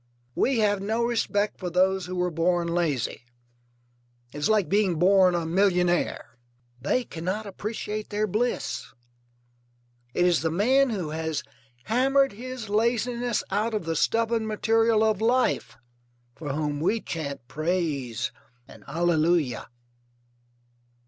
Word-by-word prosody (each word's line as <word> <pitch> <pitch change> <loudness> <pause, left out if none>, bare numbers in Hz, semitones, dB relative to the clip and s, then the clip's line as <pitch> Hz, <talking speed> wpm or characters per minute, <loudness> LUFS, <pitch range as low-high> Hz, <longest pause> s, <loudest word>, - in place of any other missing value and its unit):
We 265 - +1
have 205 -3 +2
no 220 +4 0
respect 210 -3 0
for 180 - -3
those 185 +1 +2
who 185 - -5
were 180 0 0
born 170 +1 +1
lazy; 170 -7 -1 1.1
it - - -8
is 145 - 0
like 215 -4 +3
being 200 -3 +2
born 185 +1 +5
a 170 -1 -1
millionaire: 175 -6 +1 0.4
they 245 - +1
cannot 185 +4 -4
appreciate 210 +1 -5
their 210 +1 0
bliss. 220 +5 -2 1.2
It 180 - +3
is 175 -2 +3
the 160 - 0
man 255 +11 +3
who 190 -9 -3
has 160 -1 -2 0.4
hammered 270 +5 +3
his 245 +2 -7
laziness 235 +2 0
out 215 +3 0
of 210 - -2
the 165 0 -1
stubborn 225 +5 +1
material 225 +1 +2
of 215 -2 +1
life 250 +3 +1 0.6
for 150 -3 -5
whom 150 0 -2
we 200 +9 +1
chant 140 - -5
praise 150 - -2 0.4
and - - -15
allelulia. 165 -3 +1
190 Hz, 130 wpm, -26 LUFS, 165-220 Hz, 1.2 s, born